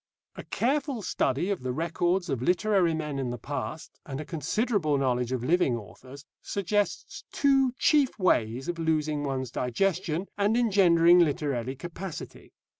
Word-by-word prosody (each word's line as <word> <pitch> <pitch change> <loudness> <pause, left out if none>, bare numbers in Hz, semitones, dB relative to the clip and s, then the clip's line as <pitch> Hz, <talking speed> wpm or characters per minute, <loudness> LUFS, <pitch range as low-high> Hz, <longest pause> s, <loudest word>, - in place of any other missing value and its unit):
A - - -8
careful 270 -2 -1
study 150 +2 0
of 195 - -2
the 130 0 -3
records 175 +5 0
of 135 -6 -2
literary 180 +2 +2
men 150 -3 -3
in 130 -2 -2
the 120 - -4
past, 145 +5 -6
and 135 -1 -6
a 155 - -5
considerable 165 - 0
knowledge 125 -2 0
of 125 -2 -2
living 145 -4 +2
authors, 130 +6 -12 0.2
suggests 205 +1 -2
two 270 -3 +3
chief 290 -4 +3
ways 125 - +1
of 175 -1 -3
losing 155 -2 0
one's 130 -3 -3
digestion 170 +7 -1
and 205 +3 +2
engendering 180 -6 +5
literary 140 -6 0
capacity. 175 +3 -8
160 Hz, 145 wpm, -27 LUFS, 135-195 Hz, 0.2 s, engendering